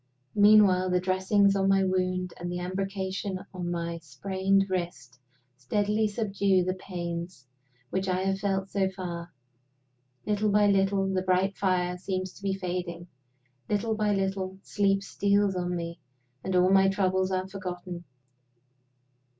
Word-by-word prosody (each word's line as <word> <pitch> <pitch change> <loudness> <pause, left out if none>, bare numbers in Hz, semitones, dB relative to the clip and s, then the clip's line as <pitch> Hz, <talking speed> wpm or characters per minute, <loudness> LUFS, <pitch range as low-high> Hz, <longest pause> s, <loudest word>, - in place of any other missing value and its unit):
Meanwhile 205 -3 +6
the 180 0 +2
dressings 190 +2 +2
on 195 0 +2
my 195 0 +4
wound 185 -1 0
and 175 0 -4
the 175 - -3
embrocation 190 +1 -3 0.2
on 180 -2 -4
my 170 -1 -3
sprained 190 +6 0
wrist 170 -9 -4 0.4
steadily 210 +11 0
subdue 200 -3 +1
the 185 +1 -1
pains 170 -5 -6 0.5
which 190 0 -1
I 185 0 0
have 195 0 0
felt 195 -1 -1
so 195 -1 +1
far. 175 -3 -6 0.9
Little 210 0 +1
by 205 0 +4
little, 195 -1 +3
the 185 - +1
bright 185 +1 +1
fire 180 -2 0
seems 185 0 -3
to - - -16
be 195 -1 -1
fading. 180 -2 -4 0.6
Little 215 +2 0
by 215 -1 +1
little, 190 -1 -1
sleep 195 -1 +1
steals 200 0 +1
on 180 0 -2
me, 170 0 -5 0.4
and 190 -1 -2
all 180 +1 +4
my 195 0 +5
troubles 190 -1 +1
are 185 0 -1
forgotten. 180 -2 -6
190 Hz, 140 wpm, -28 LUFS, 180-195 Hz, 0.9 s, Meanwhile